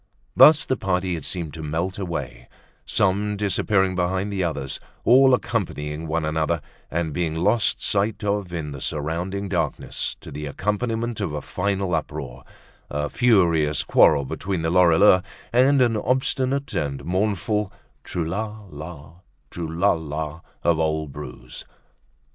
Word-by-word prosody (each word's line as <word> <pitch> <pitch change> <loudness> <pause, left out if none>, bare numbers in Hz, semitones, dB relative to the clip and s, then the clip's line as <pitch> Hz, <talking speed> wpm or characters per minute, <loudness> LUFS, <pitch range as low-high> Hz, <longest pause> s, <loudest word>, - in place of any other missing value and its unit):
Thus 160 +1 +8
the 130 - 0
party 90 -2 0
had 80 -4 -4
seemed 85 -5 -2
to 80 - -7
melt 85 +6 -2
away, 75 -10 -5 0.4
some 100 +2 +1
disappearing 100 -1 +1
behind 95 +3 -1
the 95 -2 0
others, 75 -5 -2 0.2
all 130 +2 +6
accompanying 80 -10 -3
one 80 0 -1
another, 80 +1 0 0.3
and 80 -2 -2
being 80 -2 -1
lost 105 +7 +1
sight 105 +1 0
of 100 -3 -1
in 80 -4 -4
the 70 -2 -8
surrounding 85 +6 -2
darkness, 85 -6 -2
to - - -10
the 75 +1 -5
accompaniment 110 - -2
of 85 -7 -2
a 75 - -2
final 95 -1 -1
uproar, 65 -6 -4 0.5
a 75 0 -2
furious 85 - +3
quarrel 70 - +4
between 90 +4 -3
the 80 - 0
Lorilleuxs, 90 +1 +5 0.3
and 130 +2 +5
an 120 -2 +2
obstinate 130 +4 0
and 70 -2 -2
mournful 105 +2 0 0.3
"trou 85 -2 -3
la 105 +5 -4
la, 80 +1 -10 0.3
trou 85 -2 -4
la 85 +5 +2
la," 80 0 -4 0.2
of 85 -2 +2
old 80 -2 -1
Bru's. 65 -4 -9
90 Hz, 140 wpm, -23 LUFS, 80-105 Hz, 0.5 s, Thus